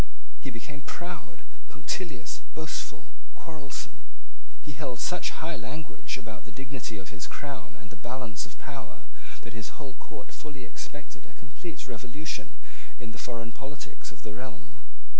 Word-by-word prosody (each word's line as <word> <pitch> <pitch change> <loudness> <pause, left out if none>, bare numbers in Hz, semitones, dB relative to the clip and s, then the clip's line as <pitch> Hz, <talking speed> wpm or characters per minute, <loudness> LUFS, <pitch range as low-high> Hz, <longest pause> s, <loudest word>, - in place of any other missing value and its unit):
He - - +2
became 135 +4 -1
proud, 135 - -1 0.3
punctilious, - - +3 0.2
boastful, 160 -1 +2 0.2
quarrelsome. 150 -4 -1 0.6
He 150 - +1
held 135 -5 +3
such 180 - +7 0.2
high 170 - +5
language 140 +5 +1
about 110 -4 -2
the - - -7
dignity 135 -2 +1
of 95 -1 -2
his 95 -2 +2
crown 140 -3 0
and 105 - -7
the 95 - -9
balance 120 - +2
of - - -8
power - - -3 0.4
that 115 - -2
his 110 -3 -1
whole 140 -4 -1
court 125 - -5
fully 145 -4 -2
expected 145 +6 -3
a - - -12
complete 130 +5 -2
revolution 125 +6 +1 0.4
in 120 -2 -1
the 110 - -3
foreign 115 -1 +2
politics 140 +2 -2
of 105 +1 -9
the 105 - +1
realm. 105 - -3
130 Hz, 150 wpm, -36 LUFS, 110-145 Hz, 0.6 s, such